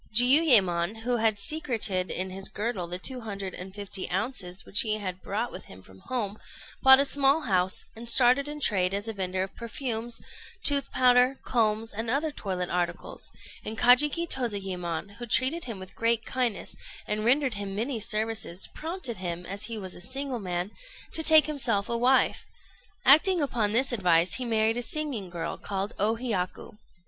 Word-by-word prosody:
Jiuyémon, 225 - +4
who 245 0 0
had 220 -2 +2
secreted 220 -8 0
in 185 +1 -4
his 195 +1 -5
girdle 205 -4 -3
the 175 +1 -4
two 250 +7 -2
hundred 200 -4 -6
and 185 +1 -8
fifty 200 -2 -2
ounces 190 -2 0
which 205 - +3
he 215 -4 0
had 185 -3 -5
brought 220 +4 -3
with - - -9
him 95 0 -14
from 95 0 -17
home, 215 -5 -3 0.4
bought 265 0 +8
a 280 - +3
small 280 +2 +2
house, 190 -6 +1
and 230 +1 -2
started 255 +3 +4
in 295 0 -6
trade 195 -7 +2
as 205 +2 -2
a 225 - -3
vendor 185 -1 -2
of 190 - -8
perfumes, 235 -1 -3 0.4
tooth 280 -1 +4
powder, 250 +1 +4
combs, 225 -2 0
and 225 +2 -3
other 295 +5 0
toilet 185 -8 -4
articles; 175 -1 -3 0.3
and 220 +1 -6
Kajiki 285 +8 +4
Tozayémon, 195 - -3
who 240 - -7
treated 265 +9 +2
him 230 -5 -6
with 185 0 -11
great 230 0 +1
kindness, 250 -5 -2 0.3
and 210 0 -3
rendered 260 +2 +2
him 200 -1 -5
many 230 +3 -2
services, 215 -4 -2
prompted 320 -7 -4
him, 175 -1 -5
as 200 +2 -4
he 230 -1 -5
was 190 -3 -6
a - - -11
single 265 +4 -4
man, 180 0 -3 0.4
to 320 - +7
take 315 -1 +8
to 305 - -4
himself 235 -8 -1
a 235 - -1
wife. 250 +3 +2 0.6
Acting 335 +6 +6
upon 235 -8 0
this 260 +5 +2
advice, 180 -6 +2
he 255 - -2
married 225 0 +1
a - - -1
singing 250 - -3
girl, 170 -1 -5
called 200 +2 -4
O 215 +3 +2
Hiyaku. 210 -3 -4
225 Hz, 180 wpm, -27 LUFS, 190-255 Hz, 0.6 s, bought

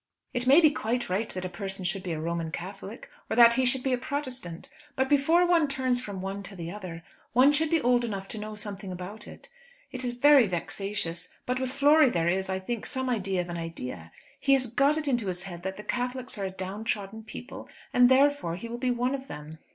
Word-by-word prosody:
It 245 +1 -1
may 275 +5 +8
be 310 -3 +6
quite 245 -6 -2
right 210 +4 0
that 185 0 -5
a - - 0
person 190 +1 -5
should 185 +2 -1
be 185 -2 -4
a 160 - -2
Roman 165 0 -2
Catholic 195 +6 -7 0.2
or - - 0
that 235 0 +8
he 260 +1 +2
should 250 +1 +2
be 265 - +1
a 250 - 0
Protestant; 255 - -4 0.3
but 265 0 +1
before 295 +5 +4
one 340 -3 +4
turns 260 -2 0
from 200 -5 -6
one 195 +1 -4
to 195 +1 -7
the 170 -2 -6
other, 180 -5 -7 0.3
one 255 +4 +6
should 305 +2 +1
be 330 0 +3
old 245 -2 +3
enough 200 -4 -4
to 220 - -4
know 215 0 -6
something 205 -2 -6
about 185 +4 -7
it. - - -12 0.4
It 255 0 -4
is 245 -1 -1
very 275 -1 +6
vexatious; 180 -1 -3 0.2
but 250 +1 -1
with 260 -1 -1
Flory 290 +1 +5
there 170 -6 0
is, 190 +1 0
I 190 - 0
think, 215 +4 -4
some 260 -2 -2
idea 195 -5 0
of 175 - -7
an 170 - -4
idea. 125 - -6 0.3
He 275 -1 +3
has 265 -1 +3
got 275 +6 +2
it 310 -1 -2
into 240 -6 +1
his 180 0 -3
head 175 -3 -8
that 190 +1 -4
the 210 - -8
Catholics 250 +2 -3
are 195 - -1
a - - -2
downtrodden 200 +3 -4
people, 225 +4 -9 0.2
and 245 0 +6
therefore 270 -9 +3
he 200 +6 -7
will 235 +1 -6
be 255 0 0
one 245 +2 0
of 270 0 -5
them." 155 - -9
220 Hz, 235 wpm, -28 LUFS, 185-260 Hz, 0.4 s, may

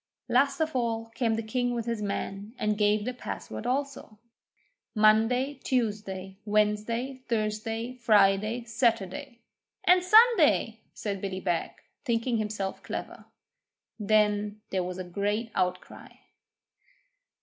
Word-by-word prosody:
Last 275 +4 +2
of 315 -2 -1
all 225 -2 -1
came 230 -1 0
the 225 - -3
king 245 +2 -1
with 230 -1 -3
his 230 -2 -2
men, 200 +2 -4
and 210 0 0
gave 210 0 +2
the 250 - -2
password 240 -1 -6
also 275 -4 -3 0.8
Monday, 225 +6 +3
Tuesday, 205 -6 -2
Wednesday, 215 +5 0
Thursday, 225 +1 -2
Friday, 215 0 +3
Saturday, 235 +2 -1 0.4
'and 360 0 +5
Sunday,' 450 +5 +5 0.2
says 200 -2 -3
Billy 190 -1 -4
Beg, 175 -3 -1 0.3
thinking 235 -1 0
himself 210 -3 -3
clever. - - -6 0.7
Then 210 0 +1
there 185 -1 0
was 180 0 -5
a 185 - -4
great 205 +5 -2
outcry. 180 -1 -2
220 Hz, 115 wpm, -28 LUFS, 205-245 Hz, 0.8 s, and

